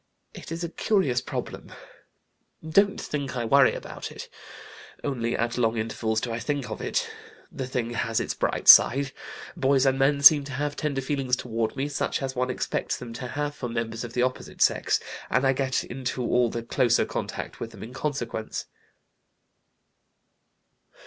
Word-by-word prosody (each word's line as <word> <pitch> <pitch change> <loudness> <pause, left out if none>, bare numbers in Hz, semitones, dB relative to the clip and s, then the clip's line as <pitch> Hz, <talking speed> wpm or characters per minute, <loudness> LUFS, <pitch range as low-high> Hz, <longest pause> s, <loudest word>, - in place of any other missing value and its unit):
It - - -10
is 165 +1 -4
a 170 - -2
curious 160 - +1
problem. - - -6 1.0
Don't 200 +5 +3
think 140 -4 -4
I 120 - -1
worry 135 +3 +5
about - - -7
it. - - -9 0.7
Only 120 -4 -1
at 120 +1 -1
long 115 -1 +1
intervals 110 0 -1
do 120 - -4
I 115 - -3
think 145 0 -3
of - - -5
it.... - - -1 0.4
The 130 - -5
thing 125 -2 -2
has 115 -1 -1
its - - -2
bright - - -2
side. 135 +1 +8 0.4
Boys 135 0 +3
and 135 0 +2
men 140 +1 +2
seem 145 0 +9
to 140 - -8
have 145 +2 -2
tender 140 -3 -2
feelings 135 -2 0
toward 115 -3 -3
me, 135 +2 -1
such 145 -1 -2
as 135 0 -3
one 125 0 0
expects 130 - -2
them 120 -2 -8
to 125 +2 -6
have 145 +3 -3
for 125 -4 -5
members 115 0 -3
of 120 -1 -7
the 125 - +1
opposite 130 0 -1
sex, - - +2 0.3
and 125 +2 +2
I 135 - +4
get 130 0 0
into 125 0 -4
all 120 0 +2
the 115 0 -4
closer 120 0 +2
contact - - -5
with - - -5
them - - -11
in 115 +3 -9
consequence." 130 -6 -3
130 Hz, 175 wpm, -26 LUFS, 120-140 Hz, 1.0 s, seem